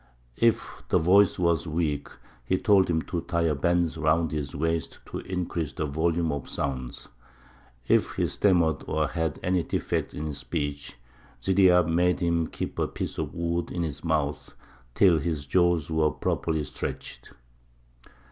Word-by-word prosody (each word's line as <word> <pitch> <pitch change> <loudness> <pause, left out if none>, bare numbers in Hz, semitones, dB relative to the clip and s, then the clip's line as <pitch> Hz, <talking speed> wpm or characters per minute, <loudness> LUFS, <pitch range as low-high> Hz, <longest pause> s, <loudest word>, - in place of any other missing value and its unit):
If 115 -1 +1
the - - +4
voice 95 +4 +4
was 85 -1 +1
weak, 75 -3 -1 0.3
he 95 +10 +1
told 95 -2 +4
him 80 -2 +1
to 85 -2 -3
tie 85 -1 -1
a 80 -2 +2
band 85 +3 +1
round 80 +1 +2
his 75 -2 -4
waist 80 +1 -1
to - - -4
increase 85 -4 -3
the 75 - -2
volume 80 +3 0
of 70 -3 -5
sound; 65 -3 -4 0.8
if - - +3
he - - +1
stammered 85 -7 +2
or 75 -1 0
had 80 -1 -2
any 90 0 +2
defect - - -2
in 75 - -4
his 75 -2 -4
speech, 70 -3 -4 0.4
Ziryāb 90 -3 +4
made 90 +2 +2
him 85 -2 +1
keep - - -5
a - - +1
piece - - -5
of - - -4
wood 85 0 -1
in 85 - -2
his 75 -4 -5
mouth 75 -3 -1 0.4
till 90 -5 +5
his 75 -2 -3
jaws 85 0 +2
were 80 -1 +3
properly 80 0 -1
stretched. - - -7
80 Hz, 155 wpm, -27 LUFS, 75-85 Hz, 0.8 s, till